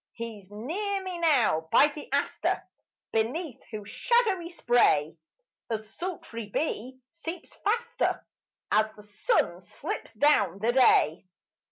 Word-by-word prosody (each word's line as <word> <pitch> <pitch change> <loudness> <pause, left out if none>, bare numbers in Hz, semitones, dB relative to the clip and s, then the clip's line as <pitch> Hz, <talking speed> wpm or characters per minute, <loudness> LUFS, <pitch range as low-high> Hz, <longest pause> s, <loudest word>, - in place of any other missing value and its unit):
He's 225 -5 -7
near 380 - -3
me 365 -2 -5
now 250 - +3
by - - +7
the 295 -1 -10
aster, 280 +1 0 0.5
Beneath 250 +6 -1
whose 210 -2 -8
shadowy 425 -8 +2
spray 240 - +3 0.5
A 225 - +1
sultry 230 - -6
bee 260 +1 -2
seeps 335 +1 -7
faster 470 +3 0 0.5
As 215 +1 +3
the 210 - -14
sun 210 - 0
slips - - -6
down 205 - +3
the 220 +4 +1
day. 190 - +4
255 Hz, 120 wpm, -28 LUFS, 215-345 Hz, 0.5 s, by